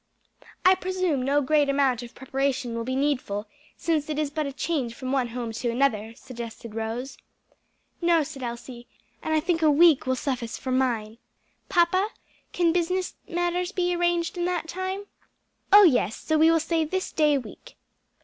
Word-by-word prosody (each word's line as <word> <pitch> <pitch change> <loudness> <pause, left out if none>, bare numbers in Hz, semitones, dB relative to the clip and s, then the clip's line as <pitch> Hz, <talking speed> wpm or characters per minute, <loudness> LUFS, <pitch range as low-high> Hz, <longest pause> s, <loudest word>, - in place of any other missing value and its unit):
"I 370 - +8
presume 370 -6 -1
no 280 +3 +2
great 295 0 +3
amount 275 -3 +2
of 240 -1 -10
preparation 265 -1 -2
will 230 0 -3
be 260 +2 -3
needful, 260 -7 -1 0.3
since 310 -3 -1
it 300 - -2
is 300 -2 -1
but 305 -1 -2
a - - -4
change 270 -5 -2
from 255 -1 -5
one 265 -3 +1
home 235 -1 -5
to 235 +2 -3
another," 230 -3 0
suggested 235 -2 -9
Rose. 225 +4 -4 0.8
"No," 340 -2 +4
said 285 -2 -8
Elsie, 240 0 -7 0.3
"and 315 - -3
I - - +4
think 330 +1 0
a 310 - +5
week 300 -2 +5
will 260 - +2
suffice 250 -3 -3
for 260 - -5
mine. 235 -4 0 0.5
Papa, 370 +2 +3 0.4
can 340 -2 +2
business 360 +1 0 0.2
matters 350 +1 -1
be 355 -3 0
arranged 345 0 0
in 345 - 0
that 355 -2 -1
time?" 375 +3 -4 0.7
"Oh 410 +1 +10
yes! 245 - +3
so 315 - -2
we 315 +1 +5
will 330 0 +4
say 325 0 0
this 370 +4 -3
day 300 -2 +3
week." 270 - -10
290 Hz, 175 wpm, -26 LUFS, 250-345 Hz, 0.8 s, Oh